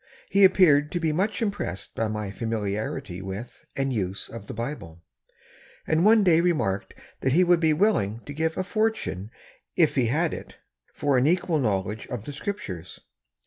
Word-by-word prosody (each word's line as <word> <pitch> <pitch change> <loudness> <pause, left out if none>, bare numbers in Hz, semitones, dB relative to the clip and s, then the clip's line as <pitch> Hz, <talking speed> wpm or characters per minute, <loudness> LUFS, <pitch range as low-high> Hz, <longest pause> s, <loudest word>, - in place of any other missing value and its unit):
He 200 0 +5
appeared 150 -6 +5
to 175 - 0
be 160 -2 +1
much 195 +6 0
impressed 195 - -4
by 115 - -1
my 105 -2 -3
familiarity 105 -3 -3
with 95 +5 -8
and 135 -1 -1
use 95 -3 -3
of 115 -3 -9
the - - -6
Bible, 105 - -6 0.8
and 160 +2 +2
one 215 +1 +6
day 170 -3 +5
remarked 150 - 0 0.2
that 130 - +1
he 180 +4 +5
would 175 -1 +4
be 160 -2 +3
willing 150 - +1
to 145 - -7
give 160 +2 -1
a 185 - 0
fortune, 215 - -1 0.5
if 165 -4 +4
he 130 -4 +2
had 155 +7 +1
it, - - -9 0.3
for 140 -3 +1
an 130 - +3
equal 170 -1 +2
knowledge 105 -3 -1
of 120 -5 -6
the 145 - -6
Scriptures. 100 - -6
140 Hz, 175 wpm, -26 LUFS, 105-175 Hz, 0.8 s, one